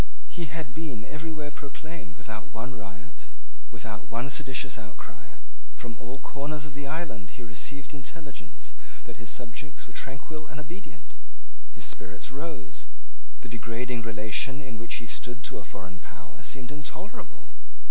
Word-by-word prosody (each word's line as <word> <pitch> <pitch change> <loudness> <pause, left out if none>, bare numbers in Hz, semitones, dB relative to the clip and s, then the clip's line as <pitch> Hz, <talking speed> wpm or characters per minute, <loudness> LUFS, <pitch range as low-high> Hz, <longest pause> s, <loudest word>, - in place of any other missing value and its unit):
He 170 - +1
had 155 -4 0
been 140 -9 +1
everywhere 150 +1 +1
proclaimed 145 - -3
without 110 +1 -2
one 120 +3 +1
riot, 100 -3 -5 0.4
without 105 0 -2
one 120 +5 +3
seditions 135 -3 +4
outcry. 105 -1 -7 0.4
From 120 -1 -1
all 120 +3 -1
corners 145 +2 +2
of 145 - -3
the 140 0 0
island 135 - +2
he - - -2
received 135 +6 +1
intelligence 145 +1 -3 0.3
that - - -4
his 110 - -1
subjects 125 +6 0
were 120 - -9
tranquil 150 +5 0
and 150 - -3
obedient. 175 +7 -5 0.6
His - - +1
spirit - - +1
rose. 135 - -1 0.6
The - - -2
degrading 115 +2 +3
relation 110 +4 +6
in 130 -6 -2
which 115 - +3
he 115 - 0
stood 120 +5 +1
to - - +1
a - - -3
foreign 90 0 -3
power 85 -9 -8
seemed 130 -1 0
intolerable. 145 - -3
130 Hz, 145 wpm, -35 LUFS, 110-150 Hz, 0.6 s, relation